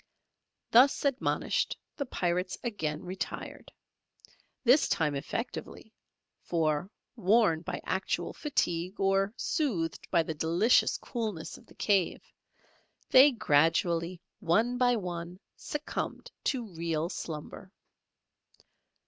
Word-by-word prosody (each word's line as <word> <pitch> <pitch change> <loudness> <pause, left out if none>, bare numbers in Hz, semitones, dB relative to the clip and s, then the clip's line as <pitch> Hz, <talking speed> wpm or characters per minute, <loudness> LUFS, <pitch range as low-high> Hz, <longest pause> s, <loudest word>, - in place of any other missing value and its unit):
Thus 260 +5 +5
admonished, 280 - 0 0.2
the 280 - -4
pirates 180 -2 -1
again 160 -10 -3
retired. 185 +2 -6 0.9
This 260 +4 +5
time 150 -3 +1
effectively, 220 - -5 0.5
for 160 +1 0 0.3
worn 205 -6 +3
by - - -4
actual - - -2
fatigue 180 - -1
or 195 +1 +2
soothed 195 - -1
by 170 -3 +3
the 160 - -4
delicious 170 +9 +3
coolness 215 -9 -4
of - - -16
the - - -18
cave, 195 -4 +1 0.9
they 270 +3 +8
gradually, 170 - +2 0.2
one 220 +9 +2
by 245 -1 +4
one, 175 -3 -5 0.2
succumbed 295 +1 -5
to 255 -4 0
real 165 -1 -1
slumber. 170 +1 -7
185 Hz, 100 wpm, -30 LUFS, 165-235 Hz, 0.9 s, they